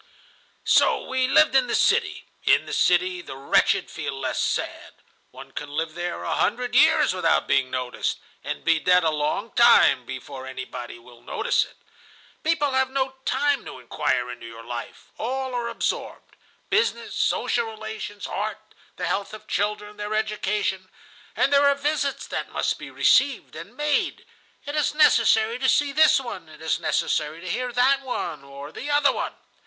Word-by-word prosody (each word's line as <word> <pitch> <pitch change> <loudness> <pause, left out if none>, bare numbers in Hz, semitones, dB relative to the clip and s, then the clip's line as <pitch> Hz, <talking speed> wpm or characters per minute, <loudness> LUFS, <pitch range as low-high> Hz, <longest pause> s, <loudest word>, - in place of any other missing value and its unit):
"So - - +4
we 260 -1 +1
lived 305 +2 +5
in 265 -2 +4
the - - 0
city. - - +2 0.2
In - - +4
the - - -6
city 365 -1 +2
the 135 - -9
wretched 135 +1 +2
feel 135 - -5
less 130 -1 -2
sad. - - -3 0.3
One 135 +1 -12
can 145 - -6
live 155 +2 -3
there 175 +1 -4
a - - -2
hundred 245 +3 0
years 300 0 +5
without 165 -4 +2
being 130 -1 +2
noticed, 125 -1 -2 0.3
and 75 - -5
be 165 - +3
dead 180 +2 +4
a 160 - +2
long 150 -1 -2
time - - +5
before 130 -1 -7
anybody 130 -2 -7
will 120 0 -17
notice - - 0
it. - - -19 0.7
People 310 -3 +1
have 265 0 +1
no 265 0 -1
time 280 0 +1
to - - -8
inquire 125 0 -1
into 120 -1 -9
your 115 0 -11
life. 120 0 -8
All 260 +2 -3
are 240 -1 -2
absorbed. - - -4 0.4
Business, 455 +3 +1
social 235 -1 0
relations, 220 -2 -7
art, - - -5 0.2
the - - -4
health 200 +2 -2
of 215 - -13
children, 210 0 -2
their 210 +1 -3
education. 210 -3 -1 0.5
And 280 - +2
there 285 0 +5
are 280 - +4
visits 280 -1 -1
that - - -4
must - - -1
be - - -8
received 270 -1 +2
and 170 +9 -10
made; 295 0 0 0.4
it 290 - -5
is 300 0 +1
necessary 230 -5 +4
to 260 0 +2
see 290 -1 +3
this 310 0 +5
one, 215 -11 -7
it 155 - -14
is 160 0 -1
necessary 155 +2 -1
to 185 - -9
hear 250 +7 -2
that 260 +3 +3
one 175 - -4
or 140 +1 -10
the 285 - -7
other 290 -1 +4
one. - - -3
220 Hz, 170 wpm, -24 LUFS, -, 0.7 s, lived